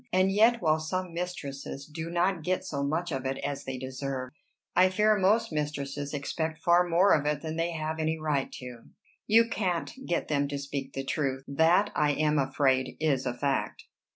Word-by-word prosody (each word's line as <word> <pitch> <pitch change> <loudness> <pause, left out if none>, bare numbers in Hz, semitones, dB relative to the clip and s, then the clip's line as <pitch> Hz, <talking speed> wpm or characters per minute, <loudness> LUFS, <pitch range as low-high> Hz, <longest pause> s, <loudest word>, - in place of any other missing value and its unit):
And 185 +1 +3
yet 225 +3 +4
while 155 -1 +3
some 180 +2 -3
mistresses 140 -6 -5
do 160 +2 -6
not 175 +1 +1
get 180 +4 -1
so 140 - -3
much 160 +5 -1
of 135 -2 -2
it 135 0 -2
as 140 0 -3
they 130 -1 -4
deserve, 130 0 -4 0.4
I 185 +1 +6
fear 210 +3 +3
most 205 +2 +2
mistresses 145 -2 -3
expect 160 +2 -3
far 175 0 +5
more 180 +4 +5
of 150 -1 +2
it 150 0 -1
than 160 0 -4
they 165 +1 -1
have 160 0 -3
any 160 0 0
right 150 -3 -1
to." 125 -2 -9 0.4
"You 230 +2 +5
can't 185 -7 -2
get 170 - -1
them 140 -2 +1
to 140 0 -3
speak 140 -1 -5
the 135 - -3
truth." 135 -3 -2
"That 165 +8 +3
I 150 -1 +2
am 150 0 +2
afraid 135 -1 +1
is 140 -4 +1
a 125 - -1
fact." 140 +2 -1
155 Hz, 190 wpm, -28 LUFS, 140-175 Hz, 0.4 s, I